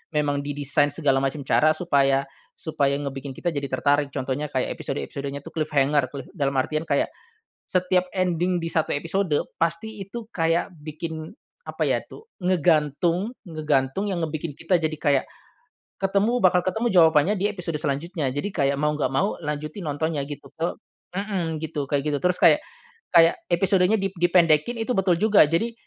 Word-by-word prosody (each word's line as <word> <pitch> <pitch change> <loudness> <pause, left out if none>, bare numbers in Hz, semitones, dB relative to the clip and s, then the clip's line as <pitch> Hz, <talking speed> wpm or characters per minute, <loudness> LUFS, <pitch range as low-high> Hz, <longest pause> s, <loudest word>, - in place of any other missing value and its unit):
memang 145 -1 +1
didesain 145 0 +1
segala 145 -3 +2
macam 135 +1 -2
cara 155 +3 +4
supaya 140 -5 +2 0.3
supaya 140 -3 0
ngebikin 140 -1 -5
kita 175 - -1
jadi 140 -1 -2
tertarik 145 +2 +1
contohnya 140 +2 -3
kayak 130 -3 -1
episode-episodenya 140 - -5
tuh - - -10
cliffhanger, 150 -2 +1
cliff 140 - -7
dalam 140 -5 -1
artian 155 +4 0
kayak, 140 - +1 0.6
setiap 180 -1 +1
ending 180 0 +1
di 170 - -3
1 160 - +1
episode 175 +5 0 0.3
pasti 195 +6 -1
itu 220 +4 -7
kayak 165 +2 0
bikin, 160 +1 -6 0.4
apa - - -2
ya - - +1
tuh, 440 - -12 0.2
ngegantung 175 - +1
ngegantung 155 +3 -1
yang 185 - -1
ngebikin 155 -1 -5
kita 170 +1 +1
jadi 155 0 -1
kayak, 145 -3 +2 0.7
ketemu 200 +4 +1
bakal 180 -1 +5
ketemu 220 +5 0
jawabannya 165 +1 +5
di 200 - +2
episode 180 -6 -3
selanjutnya. 150 +1 -2
Jadi 145 +10 -2
kayak 140 -4 +1
mau 150 +2 +1
nggak 150 -2 0
mau 195 +9 0
lanjutin 155 +2 -5
nontonnya 145 -1 -2
gitu 145 - -9
ke, 165 +1 -3 0.4
mhm, 190 -5 -2
gitu 150 -3 -3
kayak 140 -1 0
gitu 145 - 0
terus 180 0 +2
kayak - - +5 0.6
kayak 165 0 +6
episodenya 185 +3 +3
di 195 -2 -1
dipendekin 175 +3 +3
itu, 230 +2 -2
betul 195 -5 +2
juga. 205 -3 +5
Jadi, 170 +10 0
160 Hz, 160 wpm, -24 LUFS, 145-180 Hz, 0.7 s, kayak